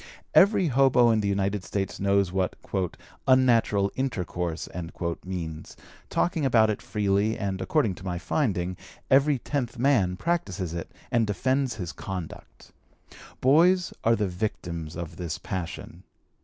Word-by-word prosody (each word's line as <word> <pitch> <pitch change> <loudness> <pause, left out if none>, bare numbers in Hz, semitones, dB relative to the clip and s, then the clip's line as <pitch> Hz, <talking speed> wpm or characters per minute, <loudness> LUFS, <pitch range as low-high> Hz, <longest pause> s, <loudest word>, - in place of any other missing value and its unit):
Every 195 -3 +5
hobo 130 -2 +5
in 110 - +2
the 100 - 0
United 100 0 0
States 95 0 -3
knows 100 -1 +2
what 95 -1 -1 0.7
"unnatural 115 -6 +4
intercourse" 90 -10 -2 0.6
means, 80 -4 -6 0.3
talking 170 -3 0
about 115 -5 +4
it 105 - -4
freely, 105 +1 0
and, 95 -1 -3
according 135 -11 +1
to 95 - -12
my 90 -2 -3
finding, 90 - -1 0.3
every 140 +1 +5
tenth 125 -1 -3
man 115 -9 +2
practises 100 - -2
it, 85 -1 -5 0.2
and 115 -2 +2
defends 130 +4 0
his 90 -5 -5
conduct. 90 -4 -8 0.7
Boys 170 +7 +4
are 115 +1 +4
the 105 -2 0
victims 90 -4 -4
of 85 -2 -6
this 85 -4 -4
passion. 90 -1 -6
100 Hz, 130 wpm, -26 LUFS, 90-130 Hz, 0.7 s, Every